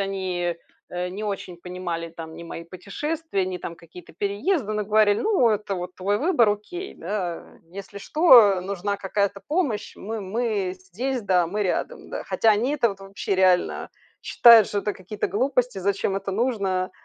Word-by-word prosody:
они 185 -3 -2 0.3
не 180 +3 -4
очень 195 -4 -5
понимали 175 -2 -5
там 160 -1 -9
ни 170 - -9
мои 170 0 -7
путешествия, 200 - -3
ни 185 -1 -4
какие-то 170 +1 -10
переезды, 210 - -1
но 210 -1 -1
говорили: 210 0 +3
"Ну, 385 - +3
это 210 -2 -1
вот 180 0 -6
твой 200 +2 0
выбор, 270 - +3
окей, 350 - -5
да". 180 -1 -4 0.3
Если 200 +1 -8
что, 225 - +6
нужна 200 +1 -2
какая-то 200 0 -1
помощь, 295 - -1
мы 220 +2 -5
мы 200 -2 -1
здесь 225 +8 -4
да, 180 -3 +2
мы 210 +3 -1
рядом 185 - -3
да. - - -4
Хотя 225 - +2
они 235 +7 0
это 240 -5 +2
вот 195 -2 -7
вообще 195 0 -3
реально 185 -1 +2 0.3
считают, 230 -3 +7
что 205 - -1
это 205 +1 -1
какие-то 190 +3 -4
глупости, 250 +1 0
зачем 195 +1 0
это 195 0 -4
нужно? 195 -5 0
200 Hz, 160 wpm, -24 LUFS, 185-220 Hz, 0.3 s, считают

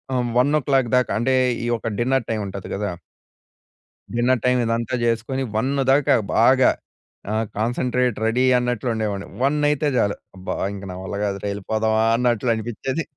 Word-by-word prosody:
ఆహ్, 125 -1 0
1:00 135 -2 +2
దాకా 125 -5 +1
అంటే 130 +3 +2 0.3
ఈ - - -2
ఒక 115 0 -4
డిన్నర్ 130 0 +1
టైమ్ 110 -2 -1
ఉంటది 95 0 -7
గదా! 100 -2 -2 1.2
డిన్నర్ 120 +1 +2
టైమ్ 125 0 +3
ఇదంతా 115 +2 -1
జేసుకొని 115 +3 -1
1 120 +5 +1 0.2
దాకా 140 0 +4 0.2
బాగా 130 +3 +5 0.6
ఆహ్, 110 0 0
కాన్సంట్రేట్ 125 +1 0
రెడీ 120 +3 +2
అన్నట్లు 125 0 -1
ఉండేవాడిని. 105 -3 -3 0.2
1 140 +3 +2
అయితే 150 0 0
చాలు 100 -3 +2 0.2
అబ్బా! 95 - -4 0.2
ఇంక 100 - -8
నా - - -6
వల్ల 95 +2 -6
కాదురా, 100 0 -3
యెళ్ళిపోదామా 110 +2 0
అన్నట్లు 120 -1 +1
అనిపించేది. 120 +7 -3
120 Hz, 150 wpm, -22 LUFS, 110-130 Hz, 1.2 s, బాగా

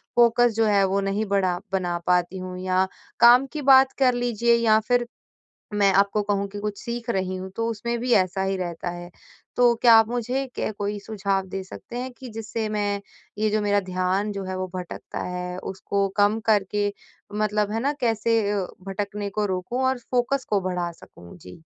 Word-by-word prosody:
Focus 240 0 +5
जो 225 - +3
है 205 -2 +4
वो 195 +1 +1
नहीं 195 +2 -1
बढ़ा 195 -3 +1
बना 180 -2 -1
पाती 180 +1 +2
हूँ। 185 0 -6
या 185 0 +1 0.3
काम 245 +3 +7
की 300 - -3
बात 265 0 +7
कर 255 -2 +4
लीजिए 235 -1 +2
या 220 -2 +4
फ़िर 245 -1 +2 0.7
मैं 200 -1 +4
आपको 200 +1 +3
कहूँ 200 -1 -1
कि 205 - -8
कुछ 210 -1 -4
सीख 235 0 -4
रही 185 -2 -1
हूँ 190 +1 -6
तो 230 0 -1
उसमें 235 +2 -3
भी 245 0 0
ऐसा 190 -1 +2
ही 195 0 0
रहता 175 -1 -4
है। 175 0 -8 0.5
तो 245 -1 +5
क्या 235 -2 +8
आप 225 -1 +6
मुझे 245 +3 -2
के - - -2
कोई 205 0 -3
सुझाव 200 -2 -2
दे 190 +1 -4
सकते 235 +5 -9
हैं 255 0 -4
कि 260 - -8
जिससे 220 0 -4
मैं 205 -1 -1 0.4
ये 215 0 +1
जो 215 0 +1
मेरा 205 0 +2
ध्यान 185 +3 0
जो 195 -1 -5
है 185 0 -4
वो 185 - -2
भटकता 180 -1 -6
है। 180 0 -4
उसको 195 +1 -2
कम 205 +2 +3
करके 205 -1 +1 0.4
मतलब 210 0 0
है 225 - -1
ना, 280 +3 +1
कैसे 230 -1 +2
अ, 195 -3 -1 0.2
भटकने 200 +1 -3
को 210 +1 -1
रोकूँ 190 +7 -2
और 260 -1 +1
फ़ोकस 250 +3 -1
को 205 -2 +2
बढ़ा 180 -2 -2
सकूँ। 85 - -15
जी। 90 - -13
205 Hz, 195 wpm, -24 LUFS, 190-230 Hz, 0.7 s, क्या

